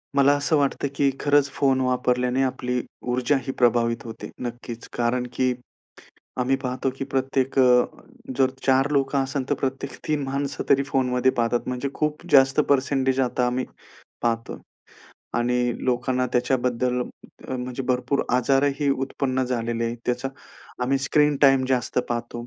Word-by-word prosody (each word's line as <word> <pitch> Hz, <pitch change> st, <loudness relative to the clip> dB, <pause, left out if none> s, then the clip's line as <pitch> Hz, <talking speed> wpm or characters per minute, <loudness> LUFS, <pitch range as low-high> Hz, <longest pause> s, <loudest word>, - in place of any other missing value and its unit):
मला 140 Hz, +1 st, +5 dB
असं 150 Hz, +2 st, +1 dB
वाटतं 140 Hz, 0 st, 0 dB
की 140 Hz, 0 st, +3 dB
खरंच 145 Hz, -1 st, +3 dB
फोन 135 Hz, -2 st, +2 dB
वापरल्याने 125 Hz, 0 st, +1 dB
आपली 125 Hz, -1 st, -1 dB, 0.3 s
ऊर्जा 130 Hz, +3 st, +2 dB
ही -, -, 0 dB
प्रभावित 115 Hz, -1 st, +2 dB
होते. 115 Hz, -1 st, -8 dB
नक्कीच 120 Hz, -1 st, -6 dB
कारण 120 Hz, +1 st, +1 dB
की 130 Hz, -1 st, +1 dB, 0.9 s
आम्ही 130 Hz, +2 st, +2 dB
पाहतो 130 Hz, +1 st, -1 dB
की -, -, -2 dB
प्रत्येक 135 Hz, 0 st, -1 dB
अ, 125 Hz, -1 st, +6 dB, 0.5 s
जर 130 Hz, -1 st, +3 dB
4 135 Hz, +1 st, +3 dB
लोकं 140 Hz, 0 st, +1 dB
असेल 135 Hz, 0 st, -3 dB
तर -, -, +4 dB
प्रत्येक 135 Hz, 0 st, -3 dB, 0.2 s
3 150 Hz, -2 st, +1 dB
माणसं 140 Hz, 0 st, -3 dB
तरी 140 Hz, 0 st, +4 dB
फोनमध्ये 130 Hz, -2 st, +1 dB
पाहतात 120 Hz, 0 st, 0 dB
म्हणजे 125 Hz, +2 st, -2 dB
खूप 150 Hz, +2 st, -2 dB
जास्त 135 Hz, 0 st, +6 dB
पर्सेंटेज 135 Hz, -1 st, +2 dB
आता 125 Hz, -1 st, +1 dB
आम्ही 125 Hz, +1 st, -1 dB, 0.6 s
पाहतो. 115 Hz, -1 st, -2 dB, 0.7 s
आणि 125 Hz, 0 st, +1 dB
लोकांना 125 Hz, 0 st, 0 dB
त्याच्याबद्दल 125 Hz, 0 st, +1 dB, 0.5 s
म्हणजे 125 Hz, 0 st, -4 dB
भरपूर 125 Hz, +2 st, +1 dB
आजारही 140 Hz, +3 st, +2 dB
उत्पन्न 135 Hz, -1 st, -1 dB
झालेले 120 Hz, -2 st, -2 dB
आहेत 115 Hz, +1 st, -2 dB
त्याचा 125 Hz, +2 st, -1 dB, 0.5 s
आम्ही 135 Hz, +2 st, +1 dB
स्क्रीन 150 Hz, +2 st, +2 dB
टाईम 135 Hz, -2 st, +6 dB
जास्त 125 Hz, -1 st, 0 dB
पाहतो. 120 Hz, 0 st, -4 dB
130 Hz, 140 wpm, -24 LUFS, 125-135 Hz, 0.9 s, अ